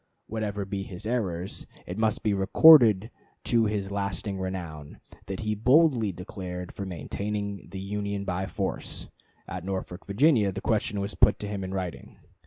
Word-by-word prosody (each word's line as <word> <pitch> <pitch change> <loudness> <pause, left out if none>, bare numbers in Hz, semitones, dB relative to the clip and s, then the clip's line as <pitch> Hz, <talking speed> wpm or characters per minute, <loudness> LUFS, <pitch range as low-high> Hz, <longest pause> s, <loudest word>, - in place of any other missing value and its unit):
Whatever 105 -2 -3
be 95 0 -3
his 95 +1 -8
errors, 95 -6 -3 0.2
it 90 - -5
must 110 0 0
be 105 -1 +2
recorded 110 +1 +7 0.3
to 115 -2 +3
his 100 -2 -2
lasting 100 0 -2
renown 85 -6 -6 0.3
that 95 +1 -4
he 110 -1 -1
boldly 125 -1 +4
declared 90 0 -7
for 100 - -6
maintaining 100 +3 -4
the 95 - -6
Union 100 0 -3
by 95 +1 -2
force. 100 -1 -4 0.4
At 90 0 -5
Norfolk, 95 -1 -5
Virginia, 110 -1 +4
the 95 - -5
question 105 -1 0
was 100 +2 -3
put - - +4
to 105 - -5
him 100 -1 -4
in 95 - -5
writing. 95 -3 -5
100 Hz, 160 wpm, -27 LUFS, 95-105 Hz, 0.4 s, recorded